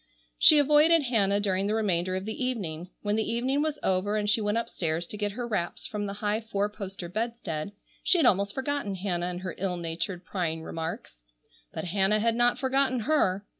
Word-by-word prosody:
She 305 - +8
avoided 300 +3 +5
Hannah 205 -6 +2
during 195 -1 0
the 215 - 0
remainder 185 -4 +1
of 190 +1 -3
the 220 +4 -4
evening. 180 -9 -3
When 205 0 0
the 220 0 0
evening 260 +5 0
was 305 -1 -1
over 190 +3 +1
and 210 -1 -1
she 215 +2 +3
went 210 +1 0
upstairs 175 -8 -2
to 190 - -7
get 205 -1 -2
her 240 +2 -4
wraps 175 -7 -3
from 205 -1 -3
the 200 - -4
high 210 +2 +1
four 210 -2 -2
poster 195 -4 -7
bedstead, 200 -4 -3 0.3
she 370 - +4
had 330 - +3
almost 200 +1 +3
forgotten 265 -7 -2
Hannah 180 -2 -2
and 180 0 -4
her 185 -2 -4
ill 180 -1 -1
natured, 175 +2 -4
prying 165 -4 -2
remarks. 160 - -5 0.5
But - - -5
Hannah 195 +3 +2
had 230 +1 +2
not 240 +1 +3
forgotten 265 -2 +1
her. 205 -8 +1
205 Hz, 200 wpm, -28 LUFS, 185-235 Hz, 0.5 s, She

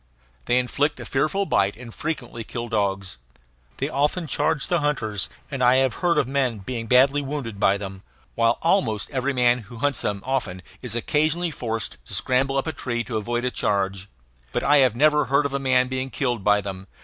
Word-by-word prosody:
They 120 - +2
inflict 140 +4 0
a - - -7
fearful 155 +9 0
bite 100 - +1
and 120 -2 -10
frequently 125 -7 -4
kill 120 +1 -5
dogs. 95 - -1 0.6
They 140 - -1
often 150 +4 0
charge 150 0 0
the 175 - +1
hunters 115 -9 -1 0.2
and 135 -2 -1
I 125 +1 +6
have 130 -2 +3
heard 175 -2 +2
of 125 - +2
men 130 -4 0
being 115 +3 -5
badly 135 +4 +5
wounded 135 -7 -5
by 100 0 +3
them, 95 -1 -7 0.3
while 115 0 +2
almost 165 - +1
every 135 0 0
man 125 -1 +3
who 115 +1 -11
hunts 145 +1 0
them 100 -1 -2
often 110 -9 -2 0.2
is 120 -3 -4
occasionally 155 +7 +1
forced 115 - -4
to - - -5
scramble 135 +2 +1
up 135 - 0
a 160 - -2
tree 120 -4 -2
to 115 -3 -3
avoid 120 +3 -2
a 125 - 0
charge. 100 -2 -1 0.4
But - - -1
I 145 +1 +5
have 130 -5 +4
never 150 +3 +4
heard 140 +2 +2
of 140 - -2
a 140 - 0
man 130 -1 +3
being 130 +1 -3
killed 120 -7 -2
by 105 0 +4
them. 95 -1 -7
125 Hz, 200 wpm, -24 LUFS, 110-140 Hz, 0.6 s, I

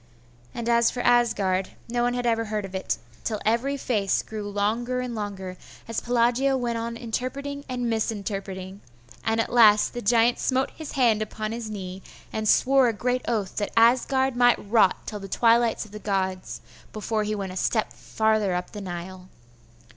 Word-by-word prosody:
and 235 -1 -4
as 235 0 +4
for 245 - -4
Asgard, 205 -7 +2
no 240 +1 -1
one 245 0 +1
had 245 0 -2
ever 230 -1 +1
heard 210 -1 -3
of 195 - -10
it.... 190 - -2 0.3
till 215 -2 -2
every 240 +6 +1
face 210 -7 0
grew 210 -2 -6
longer 225 +5 -1
and 250 -1 -3
longer, 195 -4 -5 0.3
as 230 -1 -2
Pelagia 245 +3 +2
went 235 -2 -2
on 230 0 -4
interpreting 270 +5 -4
and 245 -1 -2
misinterpreting; 200 -4 -3 0.4
and 225 0 0
at 225 - -1
last 215 -3 +6
the 240 - -4
giant 235 +2 +3
smote 260 0 0
his 315 -2 -8
hand 235 -5 +3
upon 215 0 -4
his 230 -1 -5
knee, 190 -2 -6 0.3
and 215 -1 -1
swore 265 -1 +5
a 230 - +1
great 250 +4 -1
oath 210 -5 -2
that 205 - -1
Asgard 260 +3 +4
might 245 0 +5
rot 210 -3 +3
till 210 - -5
the 195 - -8
twilight 230 +2 +3
of 210 - -16
the 210 - -8
gods 190 -3 -2 0.3
before 215 0 -2
he 215 0 -2
went 195 -2 -4
a - - -9
step 220 +3 0
farther 215 -4 0
up 180 0 -4
the 210 - -7
Nile. 185 0 -7
225 Hz, 180 wpm, -25 LUFS, 205-240 Hz, 0.4 s, last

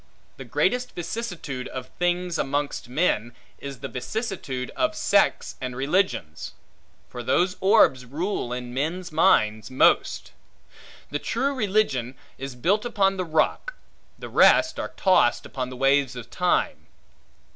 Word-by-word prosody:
The - - -8
greatest 250 0 0
vicissitude 175 - -5
of 130 -1 -7
things 175 -1 0
amongst 140 -2 -2
men, 120 -5 0 0.2
is 140 -3 -8
the 135 - -4
vicissitude 135 - -4
of 315 0 0
sects 200 -8 +1
and 130 -1 -4
religions. 135 - -1 0.5
For 125 - -7
those 180 +9 +1
orbs 190 - +4
rule 145 - -3
in 125 0 -5
men's 165 +7 -3
minds 110 - +3
most. 130 - +2 0.8
The 145 - -2
true 270 - -1
religion 195 - 0 0.2
is 135 -1 -6
built 195 - +1
upon 195 -5 +1
the 185 - -2
rock; 160 - 0 0.4
the - - -8
rest - - +4
are - - -4
tossed, 185 -11 +3
upon 130 -2 -4
the 130 - -8
waves 135 -1 +2
of 125 -2 -9
time. - - 0
145 Hz, 135 wpm, -25 LUFS, 125-195 Hz, 0.8 s, orbs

